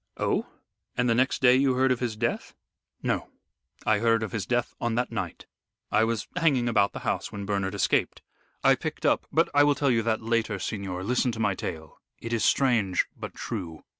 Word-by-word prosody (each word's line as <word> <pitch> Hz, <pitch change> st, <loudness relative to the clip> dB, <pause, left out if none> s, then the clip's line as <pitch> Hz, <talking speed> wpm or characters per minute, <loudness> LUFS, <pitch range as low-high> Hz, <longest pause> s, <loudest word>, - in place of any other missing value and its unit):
"Oh! -, -, 0 dB, 0.5 s
And 125 Hz, 0 st, +2 dB
the 115 Hz, -, +4 dB
next 130 Hz, +3 st, +1 dB
day 125 Hz, -1 st, +7 dB
you 130 Hz, -1 st, +3 dB
heard 130 Hz, 0 st, +3 dB
of 125 Hz, -, +1 dB
his 120 Hz, -4 st, -2 dB
death?" 120 Hz, +2 st, -2 dB, 0.5 s
"No, -, -, -1 dB, 0.6 s
I 110 Hz, -1 st, +3 dB
heard 115 Hz, 0 st, +2 dB
of 110 Hz, -, -4 dB
his 105 Hz, -6 st, -3 dB
death 120 Hz, -1 st, 0 dB
on 120 Hz, -1 st, 0 dB
that 125 Hz, +1 st, -1 dB
night. -, -, -5 dB, 0.5 s
I 110 Hz, -, +4 dB
was 115 Hz, -3 st, -2 dB
hanging 140 Hz, -8 st, +2 dB
about 100 Hz, -4 st, +2 dB
the -, -, -6 dB
house -, -, -1 dB
when 100 Hz, -1 st, -6 dB
Bernard 100 Hz, -1 st, -1 dB
escaped. 100 Hz, -, 0 dB, 0.4 s
I -, -, +6 dB
picked -, -, -4 dB
up -, -, +2 dB
but -, -, +3 dB
I 145 Hz, -, +6 dB
will 145 Hz, 0 st, +4 dB
tell 140 Hz, -1 st, +2 dB
you 115 Hz, -2 st, +2 dB
that 110 Hz, -1 st, -1 dB
later, 115 Hz, -2 st, 0 dB
signor, 95 Hz, -2 st, -4 dB
listen 125 Hz, +3 st, +1 dB
to 110 Hz, -, -6 dB
my 105 Hz, -3 st, +2 dB
tale 80 Hz, -3 st, -7 dB, 0.2 s
it 115 Hz, 0 st, -5 dB
is 115 Hz, -3 st, 0 dB
strange 115 Hz, -10 st, +2 dB
but -, -, -8 dB
true. 85 Hz, -8 st, -6 dB
115 Hz, 205 wpm, -27 LUFS, 100-125 Hz, 0.6 s, day